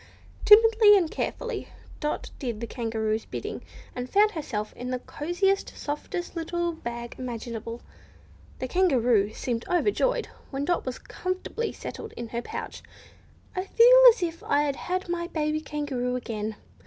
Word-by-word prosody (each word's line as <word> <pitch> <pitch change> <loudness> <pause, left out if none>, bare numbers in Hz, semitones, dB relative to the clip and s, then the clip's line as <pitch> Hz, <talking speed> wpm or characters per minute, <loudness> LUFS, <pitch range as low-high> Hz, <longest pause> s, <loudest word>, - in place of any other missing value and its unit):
Timidly 435 -1 +8
and 340 -5 0
carefully, - - -3 0.3
Dot 300 -1 -3
did 240 -5 -3
the 235 - -3
Kangaroo's 225 -2 -2
bidding, - - -5 0.3
and 250 0 -4
found 420 +1 +4
herself 230 - -4
in 250 +1 -6
the 255 - -1
cosiest, 350 +9 -1
softest 350 +5 -4
little 345 +1 -1
bag 235 -7 -6
imaginable. 230 -2 -5 0.8
The 260 - -3
Kangaroo 245 - +3
seemed 235 0 -3
overjoyed 415 +8 +2 0.2
when 275 0 -3
Dot 350 -5 0
was 255 - -3
comfortably 370 +5 -4
settled - - -8
in 235 -1 -6
her 235 +1 -3
pouch. - - -6 0.7
"I 370 - -1
feel - - +7
as 445 -5 +1
if 335 -1 -3
I 290 +1 +2
had 370 +4 -3
my 345 0 -2
dear - - -23
baby 305 -1 0
kangaroo 275 -5 -2
again!" 220 -3 -4
295 Hz, 145 wpm, -27 LUFS, 240-365 Hz, 0.8 s, Timidly